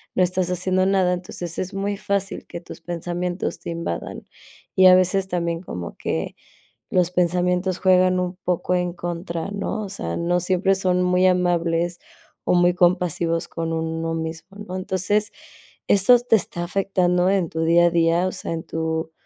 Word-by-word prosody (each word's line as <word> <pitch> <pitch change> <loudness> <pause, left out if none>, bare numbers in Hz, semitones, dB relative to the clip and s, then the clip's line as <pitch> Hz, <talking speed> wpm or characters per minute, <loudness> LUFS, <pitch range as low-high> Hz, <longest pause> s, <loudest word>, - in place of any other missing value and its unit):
no 185 - +4
estás 180 0 0
haciendo 185 +1 +1
nada, 190 -2 +2
entonces, 175 -1 -5
es 185 +2 -4
muy 200 +1 -2
fácil 200 -1 -2
que 170 - -7
tus - - -11
pensamientos 175 +1 -3
te - - -7
invadan, 165 - -5 0.5
y 185 0 +7
a 185 - +9
veces 185 +1 +2
también 170 -1 -2
como 90 - -7
que, - - -3 0.6
los 180 -1 +2
pensamientos 180 +1 +1
juegan 185 -1 +4
un 180 0 -4
poco 180 0 0
en 180 -1 -1
contra, 170 +1 -4
¿no?, 200 +1 -3
o 200 - -6
sea, 85 - -4
no 175 +1 +1
siempre 185 +2 +2
son 180 -1 +1
muy 180 +1 +3
amables, 175 -1 +1 0.5
o - - +3
muy 175 0 +4
compasivos 175 -1 +1
con 165 -1 -3
uno 165 0 -2
mismo, 165 +4 -6
¿no?, 185 - -6
entonces, 195 +3 0 0.6
eso 205 +5 +6
te 240 -2 +3
está 175 -2 -4
afectando 180 -1 +1
en 190 -4 +1
tu 160 +1 -3
día 170 +1 +5
a - - +1
día, 170 +1 +2
o 185 - -2
sea, 190 - -5
en 165 0 -4
tú, 160 0 -3
180 Hz, 170 wpm, -22 LUFS, 170-185 Hz, 0.6 s, a